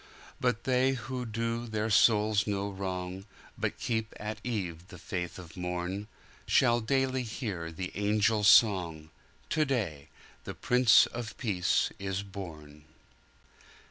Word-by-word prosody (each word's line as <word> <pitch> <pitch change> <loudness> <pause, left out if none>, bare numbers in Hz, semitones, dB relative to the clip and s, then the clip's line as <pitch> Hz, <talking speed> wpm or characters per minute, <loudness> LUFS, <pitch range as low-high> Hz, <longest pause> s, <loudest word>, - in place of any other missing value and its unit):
"But 125 -3 0
they 130 +1 +2
who 125 0 -5
do 115 +1 -2
their 110 0 -2
souls 105 0 +4
no 100 0 -1
wrong, 95 0 -5 0.3
But - - -2
keep 110 -2 -2
at 105 +1 -5
eve 90 -8 -4
the 90 - -11
faith 90 -1 -5
of 90 -2 -11
morn, 90 +3 -3 0.4
Shall 120 -2 +4
daily 130 +2 +1
hear 105 -8 -4
the 90 +2 -5
angel 105 +1 +1
song,"To 95 - +2
day 105 - -2 0.4
the - - -7
Prince 125 -2 +5
of 120 -2 -7
Peace 95 -8 +1
is 95 0 -3
born!" 80 -7 -10
105 Hz, 125 wpm, -30 LUFS, 90-115 Hz, 0.4 s, Prince